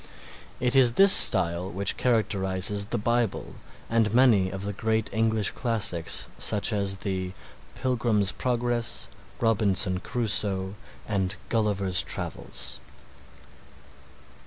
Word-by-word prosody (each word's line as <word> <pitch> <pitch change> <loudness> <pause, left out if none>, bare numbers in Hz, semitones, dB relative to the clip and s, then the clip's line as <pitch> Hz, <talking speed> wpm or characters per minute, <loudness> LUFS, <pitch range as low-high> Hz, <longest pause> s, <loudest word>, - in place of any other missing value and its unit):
It 125 +1 0
is 125 -3 +5
this 195 +7 +7
style 90 -2 +6
which 100 +1 -1
characterizes 100 -4 0
the 120 - -3
Bible 115 0 -2 0.3
and 115 -2 0
many 115 -7 +3
of 95 +1 -7
the 100 +1 -4
great 110 +2 -3
English 110 -2 0
classics 105 -9 0
such 105 +1 +1
as 100 -2 -1
the 95 -2 -4 0.4
"Pilgrim's 115 -6 -1
Progress," 120 -2 -3 0.3
"Robinson 100 -4 0
Crusoe," 100 -4 -3 0.3
and 95 -2 -2
"Gulliver's 100 -5 0
Travels." 65 0 -6
105 Hz, 105 wpm, -25 LUFS, 95-115 Hz, 0.4 s, this